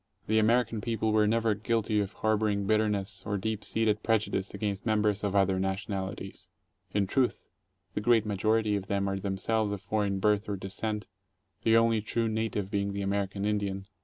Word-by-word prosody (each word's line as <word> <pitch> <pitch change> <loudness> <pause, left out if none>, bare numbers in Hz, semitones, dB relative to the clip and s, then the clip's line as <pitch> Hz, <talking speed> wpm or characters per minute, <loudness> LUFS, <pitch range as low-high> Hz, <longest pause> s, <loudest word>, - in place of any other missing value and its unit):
The 110 +1 +3
American 115 0 +2
people 110 -1 0
were 105 -1 +4
never 115 0 +2
guilty 110 0 0
of 100 0 -2
harboring 105 -2 +1
bitterness 105 -1 0
or. 100 - -2
deep 110 +1 -3
seated 110 -1 +1
prejudice 105 -3 0
against 100 -1 -3
members 105 -2 +1
of 100 -1 -1
other 95 -1 +3
nationalities. 95 0 -4 0.4
In 100 -1 +1
truth, 125 +6 0 0.5
the - - -2
great 115 -1 +4
majority 105 +1 +1
of 95 -1 -3
them 100 0 0
are 95 0 -1
themselves 100 +2 -1
of 100 - -3
foreign 100 0 -1
birth 105 +2 +1
or 100 - -1
descent, 105 +3 -4 0.5
the 115 0 +4
only 115 -1 +3
true 115 +2 -1
native 110 -3 -2
being 100 -1 -1
the 100 0 -3
American 100 0 -1
Indian. 100 -2 -1
105 Hz, 170 wpm, -29 LUFS, 100-110 Hz, 0.5 s, were